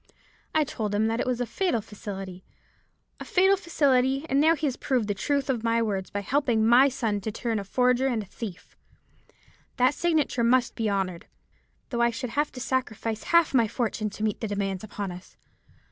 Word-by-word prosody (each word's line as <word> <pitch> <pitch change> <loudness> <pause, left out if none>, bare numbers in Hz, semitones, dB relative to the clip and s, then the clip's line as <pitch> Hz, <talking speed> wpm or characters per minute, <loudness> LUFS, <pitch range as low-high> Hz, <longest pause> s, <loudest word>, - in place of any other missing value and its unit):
I 310 - +4
told 215 -7 -3
him 210 - +2
then - - +1
that 225 +1 -1
it - - -1
was 250 -1 0
a 245 - 0
fatal 355 - 0
facility, 195 -3 -8 0.8
a - - -5
fatal 385 +2 +4
facility, 275 -6 +1
and 275 0 +2
now 320 +2 +5
he 305 0 -3
has 265 -4 0
proved 250 -7 -1
the 205 - 0
truth 280 +8 -1
of 245 -5 -1
my 230 0 +2
words 200 -4 -1
by 205 - -3
helping 240 -1 +1
my 250 +4 +6
son 225 -6 -2
to 220 - -3
turn 225 -2 -2
forger 250 +5 +2
and 225 -6 -2
thief. 195 -3 -8 1.0
That 255 +2 +4
signature 310 -7 +1
must 245 +1 +3
be 225 -2 -1
honoured, 190 -4 -2 0.6
though 235 -3 -1
I 235 - +4
should 235 +1 -5
have 295 +4 0
to 255 - -8
sacrifice 230 -4 -2
half 335 -3 +4
my 235 -4 +4
fortune 220 -2 -2
to 210 +2 -7
meet 215 -1 -1
the 220 - -1
demands 195 -2 -2
upon 205 -2 -5
us. 180 +1 -12
235 Hz, 195 wpm, -26 LUFS, 210-265 Hz, 1.0 s, my